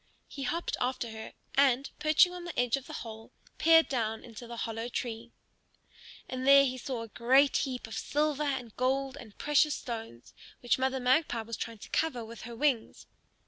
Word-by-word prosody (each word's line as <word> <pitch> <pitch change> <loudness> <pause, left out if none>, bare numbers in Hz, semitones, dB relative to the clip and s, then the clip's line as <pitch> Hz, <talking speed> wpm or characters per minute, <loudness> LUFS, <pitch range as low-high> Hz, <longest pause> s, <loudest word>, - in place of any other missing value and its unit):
He 280 - -8
hopped 330 +6 -1
after 250 -2 -1
her 220 0 -8 0.2
and, 275 -1 +3
perching 310 +4 +5
on 355 -1 -7
the 345 -1 -4
edge 245 -2 +3
of 275 -1 -7
the - - -8
hole, 220 0 -10 0.3
peered 325 0 +6
down 225 -4 -2
into 235 0 -10
the 235 0 -7
hollow 225 +1 -3
tree. 235 -1 -5 1.0
And 255 +1 -4
there 275 0 +8
he 255 -1 -3
saw 245 -2 -4
a - - -8
great 260 +6 +4
heap 255 -2 -2
of 225 - -9
silver 300 0 0
and 265 -6 -2
gold 265 +1 0
and 235 -7 -12
precious 295 0 +3
stones, 225 - -7 0.3
which 245 +1 +1
Mother 265 0 0
Magpie 250 -1 +2
was 230 +1 -5
trying 230 +1 -5
to 210 - -12
cover 250 -8 0
with 230 +1 -10
her 235 - -7
wings. 265 -3 0
255 Hz, 185 wpm, -30 LUFS, 230-280 Hz, 1.0 s, there